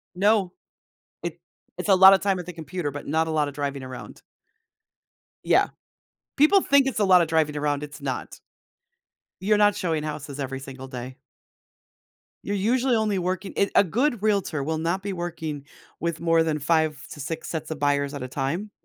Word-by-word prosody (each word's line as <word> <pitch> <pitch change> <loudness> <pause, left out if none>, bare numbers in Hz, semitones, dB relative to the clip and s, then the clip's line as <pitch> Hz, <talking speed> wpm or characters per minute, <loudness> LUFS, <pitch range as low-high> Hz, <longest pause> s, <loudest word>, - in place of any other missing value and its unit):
No. 200 -1 +2 0.7
It - - -5 0.4
it's - - -4
a 195 - +7
lotta 190 +1 +8
time 195 -2 0
at 180 - -7
the 180 - -6
computer, 165 -1 -4
but 145 +1 -8
not 160 +2 +1
a - - -2
lot 150 -2 +1
of 145 - -8
driving 140 -1 -3
around. 130 -1 -9 1.2
Yeah. - - +4 0.7
People 335 +7 +6
think 280 -1 +4
it's 255 - -2
a - - +3
lotta 180 -3 +6
driving 155 -2 +1
around, 145 0 -1
it's 145 0 -9
not. 135 -3 -4 1.1
You're 210 +2 +3
not 205 -1 +4
showing 160 -6 -1
houses 145 -2 -6
every 135 -1 -4
single 135 -1 -9
day. 130 0 -7 1.3
You're 205 - -2
usually 245 +5 +2
only 215 -3 +1
working 185 +2 -3
eh, 200 - +2
a - - +7
good 240 - 0
realtor 200 -9 0
will 160 +2 -2
not 170 +4 -1
be 200 -1 -3
working 160 -5 -5 0.3
with 170 0 -2
more 165 -1 +3
than 155 -2 -1
5 155 0 +1
to - - -9
6 160 +3 -5
sets 160 -1 -4
of - - -5
buyers 140 0 +1
at 140 -3 -5
a 130 - -4
time, 150 +11 -3
160 Hz, 180 wpm, -25 LUFS, 145-195 Hz, 1.3 s, lotta